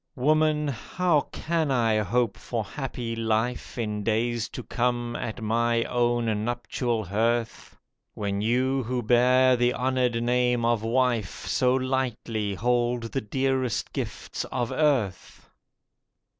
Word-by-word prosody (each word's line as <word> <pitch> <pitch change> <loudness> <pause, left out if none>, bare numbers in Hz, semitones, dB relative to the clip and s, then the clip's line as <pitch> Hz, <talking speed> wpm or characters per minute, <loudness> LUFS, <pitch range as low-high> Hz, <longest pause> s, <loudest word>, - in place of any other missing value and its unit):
Woman, 150 +2 +2
how 150 +4 0
can 160 -2 -1
I 115 -4 +2
hope 110 +1 +1
for 115 -3 -3
happy 120 -3 -5
life 115 +2 -1
In 105 -3 -2
days 115 +1 0
to 125 - -7
come 120 0 -1
at 115 -1 -5
my 115 +1 +1
own 120 -3 0
nuptial 120 -1 -2
hearth, 115 +4 -1 0.4
When 100 -1 -2
you 130 +4 +1
who 125 0 -2
bear 125 +2 +5
the 120 0 +2
honoured 125 -2 0
name 125 -1 +2
of 115 -2 +2
wife 115 -3 0
So 125 -1 +2
lightly 120 -5 -1
hold 120 +1 0
the 135 - -1
dearest 130 +1 -1
gifts - - -4
of 120 -3 -3
earth? 135 - 0
120 Hz, 125 wpm, -26 LUFS, 115-130 Hz, 0.4 s, bear